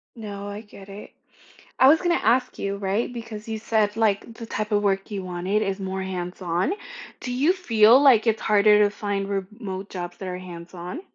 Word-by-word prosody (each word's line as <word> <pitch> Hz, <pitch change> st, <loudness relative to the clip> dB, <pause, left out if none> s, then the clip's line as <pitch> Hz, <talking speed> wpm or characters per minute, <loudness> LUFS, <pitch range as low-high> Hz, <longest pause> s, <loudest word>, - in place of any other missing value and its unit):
No, 205 Hz, -3 st, -7 dB
I 205 Hz, +1 st, -6 dB
get 200 Hz, -2 st, -14 dB
it. 200 Hz, +2 st, -10 dB, 0.7 s
I 260 Hz, -, +6 dB
was 320 Hz, +3 st, +6 dB
gonna 350 Hz, -1 st, +2 dB
ask 245 Hz, +1 st, +1 dB
you, 200 Hz, 0 st, -3 dB
right? 200 Hz, +5 st, -1 dB
Because 230 Hz, -2 st, -8 dB
you 220 Hz, -1 st, -3 dB
said, 215 Hz, -1 st, 0 dB
like, 220 Hz, 0 st, +1 dB
the 230 Hz, -1 st, -8 dB
type 215 Hz, 0 st, -3 dB
of 205 Hz, -1 st, +2 dB
work 195 Hz, 0 st, 0 dB
you 195 Hz, -2 st, -4 dB
wanted 185 Hz, +4 st, -1 dB
is 195 Hz, -1 st, -2 dB
more 190 Hz, 0 st, -3 dB
hands 180 Hz, 0 st, -5 dB
on. 175 Hz, -, 0 dB, 0.5 s
Do 250 Hz, -, -5 dB
you 285 Hz, +8 st, +3 dB
feel 235 Hz, -, +5 dB
like 245 Hz, -5 st, +5 dB
it's 220 Hz, -1 st, +1 dB
harder 210 Hz, 0 st, +5 dB
to 205 Hz, -, +2 dB
find 200 Hz, -1 st, -3 dB
remote 195 Hz, 0 st, -5 dB
jobs 175 Hz, -1 st, -6 dB
that 190 Hz, -, -6 dB
are 180 Hz, 0 st, -4 dB
hands 175 Hz, -1 st, -10 dB
on? 180 Hz, -, -7 dB
205 Hz, 205 wpm, -24 LUFS, 190-225 Hz, 0.7 s, I